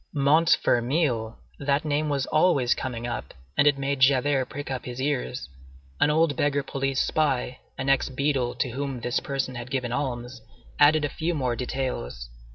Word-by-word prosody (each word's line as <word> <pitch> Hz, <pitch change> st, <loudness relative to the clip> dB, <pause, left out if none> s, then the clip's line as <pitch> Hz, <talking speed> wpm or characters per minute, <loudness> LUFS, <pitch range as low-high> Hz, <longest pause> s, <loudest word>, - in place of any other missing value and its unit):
Montfermeil! 140 Hz, -4 st, +2 dB, 0.2 s
that 140 Hz, +1 st, 0 dB
name 150 Hz, 0 st, 0 dB
was 140 Hz, -2 st, 0 dB
always 155 Hz, -7 st, +3 dB
coming 120 Hz, -3 st, -4 dB
up, 120 Hz, -, -5 dB, 0.2 s
and 145 Hz, -, +4 dB
it 145 Hz, -1 st, +4 dB
made 140 Hz, 0 st, -1 dB
Javert 135 Hz, 0 st, +3 dB
prick 145 Hz, -1 st, -6 dB
up 130 Hz, -, -4 dB
his 125 Hz, 0 st, -6 dB
ears. 135 Hz, -1 st, -2 dB, 0.5 s
An -, -, +4 dB
old 155 Hz, -1 st, +3 dB
beggar 145 Hz, 0 st, +1 dB
police 135 Hz, -1 st, -2 dB
spy, 130 Hz, -4 st, 0 dB, 0.2 s
an 130 Hz, -, -3 dB
ex 135 Hz, 0 st, +3 dB
beadle, 135 Hz, -2 st, 0 dB
to 125 Hz, -, -1 dB
whom 135 Hz, -1 st, -4 dB
this 125 Hz, +2 st, 0 dB
person 135 Hz, -2 st, -3 dB
had 120 Hz, 0 st, -7 dB
given 125 Hz, -2 st, -2 dB
alms, 125 Hz, -2 st, -3 dB, 0.4 s
added 150 Hz, +1 st, +5 dB
a -, -, -2 dB
few 165 Hz, +4 st, -2 dB
more 130 Hz, -5 st, 0 dB
details. 115 Hz, -, -4 dB
135 Hz, 165 wpm, -26 LUFS, 125-145 Hz, 0.5 s, added